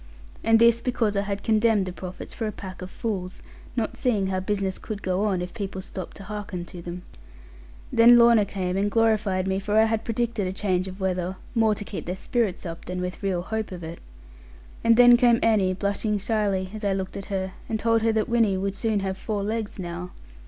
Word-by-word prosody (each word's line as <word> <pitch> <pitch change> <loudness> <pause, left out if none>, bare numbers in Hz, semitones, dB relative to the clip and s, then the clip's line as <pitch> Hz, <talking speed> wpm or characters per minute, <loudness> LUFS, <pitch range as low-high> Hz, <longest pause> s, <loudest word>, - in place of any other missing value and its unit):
And 225 0 +5
this 235 0 +5
because 230 -4 0
I 200 - +2
had 200 0 -4
condemned 220 -2 +3
the 185 - -5
prophets 185 0 -8
for 225 - -3
a - - -2
pack 185 -3 -9
of 180 - -6
fools; 190 -4 -4 0.3
not 230 -3 -1
seeing 215 -6 +1
how 190 0 -1
business 195 0 -2
could 210 -2 -6
go 185 +2 0
on, 190 -4 0
if 180 - -7
people 200 -4 -5
stopped 185 0 -7
to 200 - -9
hearken 200 -3 -5
to 175 - -7
them. 175 +1 -7 0.9
Then 235 +1 +8
Lorna 235 -2 +6
came 185 -2 -2
and 200 +1 +1
glorified 210 -4 +2
me, 190 0 0
for 205 +2 0
I 220 - +7
had 225 0 0
predicted 230 -3 -1
a 185 - -3
change 185 -2 0
of 190 +1 -8
weather, 185 -1 -1 0.2
more 225 -3 +3
to 205 - -5
keep 195 - -6
their 180 - -2
spirits 205 -2 -1
up, 165 -1 -6
than 180 +1 -4
with 180 0 -4
real 185 -3 -1
hope 220 +1 -3
of 175 -2 -7
it; 165 +1 -7 0.8
and 230 0 +5
then 245 0 +8
came 240 -2 +5
Annie 200 -5 +3
blushing 205 +2 -1
shyly, 200 -3 -1
as 215 0 -7
I 200 -1 +2
looked 190 -1 -4
at 195 - -5
her, 190 -1 -3 0.2
and 220 - -1
said 225 0 +2
that 215 - +1
Winnie 230 -5 +2
would 195 +1 -1
soon 210 0 0
have 190 0 -3
four 210 -3 -2
legs 215 0 -3
now. 180 -1 -6
200 Hz, 215 wpm, -25 LUFS, 185-220 Hz, 0.9 s, Then